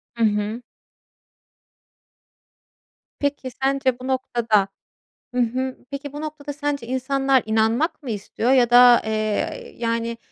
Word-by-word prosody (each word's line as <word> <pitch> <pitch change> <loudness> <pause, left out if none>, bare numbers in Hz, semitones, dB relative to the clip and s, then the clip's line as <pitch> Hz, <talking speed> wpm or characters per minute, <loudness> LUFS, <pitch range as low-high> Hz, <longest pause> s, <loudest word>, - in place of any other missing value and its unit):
Hı 230 - 0
hı. 210 +2 0 2.6
Peki 285 -2 -2
sence 270 -2 +1
bu 255 - -7
noktada 235 -6 +1 0.7
Hı 250 - +2
hı. 255 +2 -1
Peki 280 0 -6
bu 295 - -6
noktada 300 -1 -6
sence 290 -4 -3
insanlar 265 0 +1
inanmak 225 +9 +1
mı 265 - -6
istiyor? 215 +3 -2
Ya 250 -3 +4
da, 245 0 +8
eee, 215 -1 -2
yani, 230 0 -2
250 Hz, 115 wpm, -22 LUFS, 230-275 Hz, 2.6 s, da